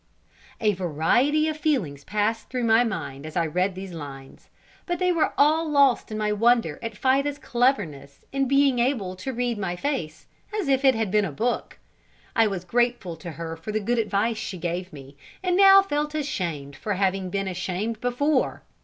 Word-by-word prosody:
A 210 -2 +2
variety 190 - +2
of 310 - -1
feelings 225 - -1
passed 215 +4 -1
through 250 -1 -2
my 225 +1 +5
mind 160 - -4
as 155 +2 -6
I 170 - +2
read 180 +4 0
these 190 -1 -7
lines. 140 -4 -10 0.4
But 350 -1 -1
they 365 -1 +2
were 335 -3 +1
all 310 +2 +3
lost 280 -6 +3
in 215 - -3
my 210 0 0
wonder 225 -6 +2
at 230 -2 -6
Fida's 275 +3 +1
cleverness 205 - -1
in 275 -1 0
being 275 -1 +3
able 235 -7 0
to 265 +8 -4
read 245 -2 -2
my 185 -3 -2
face, 175 - -3 0.3
as 380 - -2
if 270 0 +2
it 265 -2 +5
had 220 -4 -1
been 210 0 +3
a 185 - -2
book. 235 - -2 0.6
I 225 -1 +5
was 190 -3 -4
grateful 240 -4 0
to 170 0 -8
her 165 +2 -6
for 165 +6 -7
the 215 - 0
good 235 +3 0
advice 215 +1 0
she 190 - -5
gave 175 +2 -4
me, 140 -2 -12 0.3
and 360 -1 +1
now 390 0 +8
felt 300 -4 -2
ashamed 170 - -3
for 205 +7 -3
having 190 -1 0
been 195 +1 -2
ashamed 190 +5 -3
before. 255 +3 0
215 Hz, 190 wpm, -25 LUFS, 175-270 Hz, 0.6 s, now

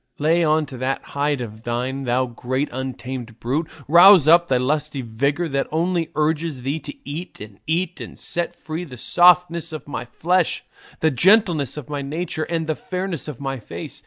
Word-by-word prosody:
Lay 165 +3 +2
on 155 0 +2
to 135 -2 -9
that 130 +1 -2
hide 145 -1 0
of 110 -2 -7
thine, 125 +4 -3
thou 125 +1 +1
great 130 +3 -3
untamed 130 -2 -6
brute, 145 +7 -1 0.2
rouse 175 0 +8
up 170 +2 +6
thy 130 - +2
lusty 145 +1 -1
vigour 140 +9 -1
that 140 -1 -1
only 170 +1 0
urges 155 -3 -1
thee 140 +5 -1
to 155 - -8
eat 160 +5 -6
and 105 -1 -11
eat, 165 +2 -1
and - - -9
set 175 0 -2
free 160 +2 -5
the 135 -7 -10
softness 175 +2 +4
of 155 -2 -7
my 140 -4 -5
flesh, 175 +7 0 0.4
the 160 - +3
gentleness 175 - +3
of 150 - -7
my 145 -1 -3
nature, 155 +2 -3
and 165 -1 -2
the 155 - 0
fairness 180 -1 -4
of 150 -6 -7
my 135 -2 -3
face. 110 - -8
150 Hz, 185 wpm, -22 LUFS, 130-170 Hz, 0.4 s, rouse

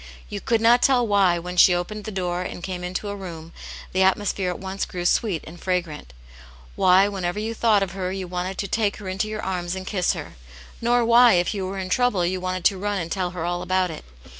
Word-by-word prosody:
You - - -5
could 230 -1 +1
not 240 +2 +5
tell 250 -3 +4
why, 195 -5 +3
when 180 +1 -6
she 180 0 +7
opened 205 +4 -4
the 215 - -5
door 180 -2 -2
and 180 -1 -6
came 180 -1 -5
into 180 +3 -4
a 200 - -4
room 170 -4 -9 0.4
the 190 - +2
atmosphere 190 0 +1
at 180 - -3
once 190 +1 -4
grew 175 -1 -5
sweet 190 -3 +1
and 165 +2 -11
fragrant; 170 - -3 0.6
why, 185 +2 +5
whenever 190 -2 -3
you 220 +2 -2
thought 220 -3 +3
of 190 - -4
her, 185 0 -3
you 190 -1 -4
wanted 180 +1 -4
to 200 - -2
take 210 +1 0
her 205 - -9
into 195 +3 -2
your 215 0 -5
arms 180 -1 -2
and 190 0 -6
kiss 185 -3 0
her; - - -8 0.5
nor 240 0 +2
why, 235 0 +7
if 175 +3 +2
you 195 -3 -3
were 195 +1 -5
in 185 -1 -4
trouble, 225 -5 +2
you 185 +1 -2
wanted 185 0 -3
to 195 - +3
run 205 +1 -1
and 170 -3 -4
tell 185 -2 -1
her 175 -2 -5
all 175 0 -2
about 185 -1 0
it. 155 - -8
185 Hz, 240 wpm, -23 LUFS, 180-205 Hz, 0.6 s, she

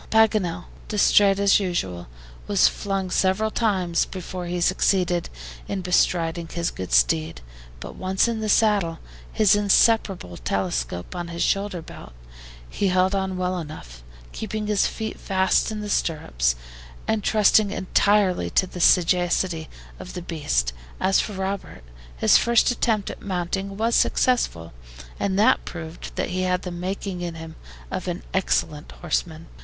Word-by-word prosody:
Paganel, 205 -6 +2 0.2
DISTRAIT 200 -1 +4
as 200 0 +4
usual, 95 - -3 0.4
was 200 -2 +4
flung 195 -2 -3
several 195 +4 +1
times 185 -8 +1
before 180 -1 -7
he 175 0 -2
succeeded 180 -1 +1 0.4
in 195 -2 -3
bestriding 170 -2 +1
his 170 -1 -2
good 95 -2 -7
steed, 60 +4 +2 0.4
but - - -8
once 190 +4 0
in 230 -2 -2
the 215 -1 -2
saddle, 205 -7 +2 0.3
his 215 -1 +4
inseparable 200 - +2
telescope 90 - -3
on 175 -1 -4
his 170 0 -3
shoulder 195 -4 -1
belt, 65 - -12 0.5
he 200 - -1
held 185 +1 +2
on 190 -1 -1
well 185 0 -1
enough, 60 - -9 0.3
keeping 215 0 -4
his 210 -1 +2
feet 220 -1 -5
fast 190 +2 +1
in 215 -1 -4
the 210 - -5
stirrups, 65 - 0 0.5
and 220 -2 0
trusting 215 -1 +4
entirely 195 - +2
to 135 - +2
the 180 -1 -7
sagacity 175 -1 +2 0.3
of - - -9
his 180 - -5
beast. 105 - -1 0.3
As 195 - +3
for 210 - -2
Robert, 190 - -5 0.3
his - - +5
first 235 +1 +3
attempt 220 -4 0
at - - -11
mounting 195 +1 -3
was 230 +2 0
successful, 85 - +1 0.5
and 195 0 0 0.2
proved 160 -1 -8
that - - -2
he 185 +1 -2
had 180 -1 0
the 180 - -5
making 180 +1 -4
in 170 -1 -4
him 165 0 -9 0.4
of 185 0 -4
an 175 0 -4
excellent 155 -5 -1
horseman. 165 -1 -3
185 Hz, 145 wpm, -23 LUFS, 165-200 Hz, 0.5 s, his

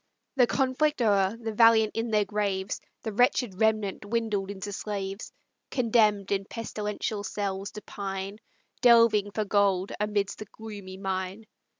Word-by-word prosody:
The 250 -3 +5
conflict 270 +4 +1
o'er, 205 -2 +2
the 225 -1 -4
valiant 225 -1 +5
in 225 +1 -1
their 210 -2 +2
graves, 200 -2 -2 0.2
The 220 - -3
wretched 235 -3 +2
remnant 215 -3 +1
dwindled 210 -2 -1
into 200 0 -5
slaves; 195 0 -4 0.4
Condemn'd 215 -5 +2
in 195 -1 0
pestilential 210 -1 -4
cells 195 -1 -3
to 210 - -8
pine, 195 +1 -5 0.4
Delving 230 -4 +6
for 215 +1 -2
gold 200 -2 +2
amidst 205 -1 -1
the 215 - -6
gloomy 200 -3 -9
mine. 190 +2 -3
210 Hz, 135 wpm, -27 LUFS, 195-225 Hz, 0.4 s, Delving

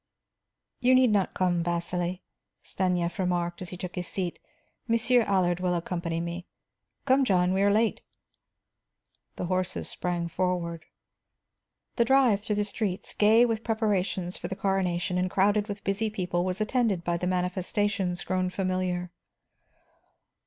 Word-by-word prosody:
"You 255 +1 +4
need 255 -3 +5
not 200 -3 +1
come, 175 -2 +1
Vasili," 175 +1 -2 0.4
Stanief 180 -2 -1
remarked, 175 -1 -1
as 180 - -5
he 180 - -7
took 180 0 -6
his 180 -1 -4
seat. 180 -3 -3 0.5
"Monsieur 235 +2 +3
Allard 185 -5 +1
will 180 -1 0
accompany 170 -1 -2
me. 170 +1 -5 0.6
Come, 270 0 +4
John; 185 -5 +2
we 190 - +1
are 200 - +4
late." 220 +1 +2 1.3
The - - -3
horses 185 +1 -2
sprang 175 -1 -2
forward. 170 -2 -2 1.1
The 235 - +4
drive 250 -5 +4
through 210 0 -2
the 205 0 0
streets, 200 -2 -3
gay 220 +3 +5
with 225 -2 -1
preparations 200 -5 -1
for - - -5
the 190 - -4
coronation 180 -2 0
and 185 0 0
crowded 205 +2 +2
with 205 -1 -6
busy 200 +3 0
people, 180 -4 -1
was 185 0 -2
attended 215 -5 +1
by 170 0 0
the 180 - -2
manifestations 185 +1 -1
grown 185 0 0
familiar. 185 -1 -2
185 Hz, 145 wpm, -27 LUFS, 175-205 Hz, 1.3 s, need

